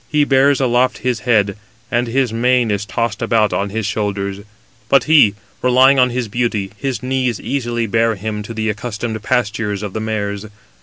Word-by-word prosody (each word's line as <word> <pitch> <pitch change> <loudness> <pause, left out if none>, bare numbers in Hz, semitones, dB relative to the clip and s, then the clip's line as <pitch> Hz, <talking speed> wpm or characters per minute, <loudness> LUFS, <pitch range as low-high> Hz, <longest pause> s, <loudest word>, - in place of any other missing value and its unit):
He 150 -1 +3
bears 140 0 +3
aloft 125 -1 +2
his 125 -3 0
head, 100 -4 +3 0.4
and 120 +1 +1
his 125 -1 0
mane 120 0 +2
is 105 0 -2
tossed 115 -1 -2
about 110 -2 +2
on 100 +1 -1
his 110 +1 -3
shoulders: 100 -2 -2 0.5
but 140 - +5
he, 145 -10 +5 0.3
relying 130 +2 +5
on 125 0 +4
his 125 -1 -2
beauty, 110 -3 -1
251 105 - -26
his 130 -1 -4
knees 130 -3 -1
easily 120 -4 -2
bear 115 +1 +1
him 105 +1 -4
to 105 +2 -7
the 110 0 -2
accustomed 110 +1 -4
pastures 105 -3 -1
252 - - -3
of 100 - -7
the - - -3
mares. 105 -2 -3
115 Hz, 190 wpm, -18 LUFS, 105-125 Hz, 0.5 s, but